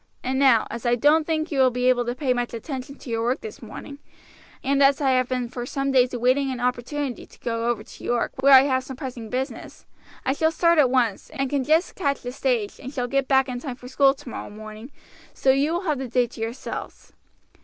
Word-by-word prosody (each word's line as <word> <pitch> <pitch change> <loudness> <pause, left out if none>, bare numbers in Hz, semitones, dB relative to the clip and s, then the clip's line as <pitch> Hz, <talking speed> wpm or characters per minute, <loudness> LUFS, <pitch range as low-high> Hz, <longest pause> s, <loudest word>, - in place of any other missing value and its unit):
And 260 +1 -1
now, 260 -5 +5
as 235 - -6
I 240 -1 +3
don't 300 +5 +3
think 315 0 -1
you 280 - -1
will 260 -1 +6
be 250 +1 -1
able 245 -1 +3
to 240 +1 -2
pay 260 -1 +1
much 245 -1 -3
attention 265 +3 -6
to 270 - -12
your 225 0 0
work 245 +4 0
this 440 - -9
morning, 280 0 -9 0.6
and 275 +1 +1
as 275 0 +5
I 275 -3 +2
have 255 -1 +2
been 250 -2 -1
for 245 0 -6
some 275 +2 -2
days 255 -1 +4
awaiting 255 +3 +1
an 255 -2 -4
opportunity 250 +2 -2
to - - -20
go 230 -1 -2
over 240 - -1
to - - -14
York, 240 -1 0
where 275 0 +8
I 260 - +9
have 260 -2 +1
some 265 0 -8
pressing 245 -4 -6
business, 260 +3 -5 0.4
I 265 - +2
shall 320 +3 +1
start 335 0 +3
at 270 -4 +5
once, 240 -6 0
and 270 -1 -3
can 280 -2 +1
just 315 +6 +2
catch 280 -6 -1
the 245 - -4
stage, 245 -5 -1
and 265 - -7
shall 250 -3 -2
get 275 +1 0
back 265 -1 +3
in 250 -1 -4
time 255 -1 -6
for 250 0 -12
school 270 +1 +3
tomorrow 250 -3 -8
morning, 215 +3 -10 0.5
so 265 - +3
you 275 +4 +2
will 345 - -1
have 305 -7 -1
the 265 - -4
day 245 +1 +2
to 230 -1 -11
yourselves." 225 +3 -6
260 Hz, 240 wpm, -24 LUFS, 245-275 Hz, 0.6 s, I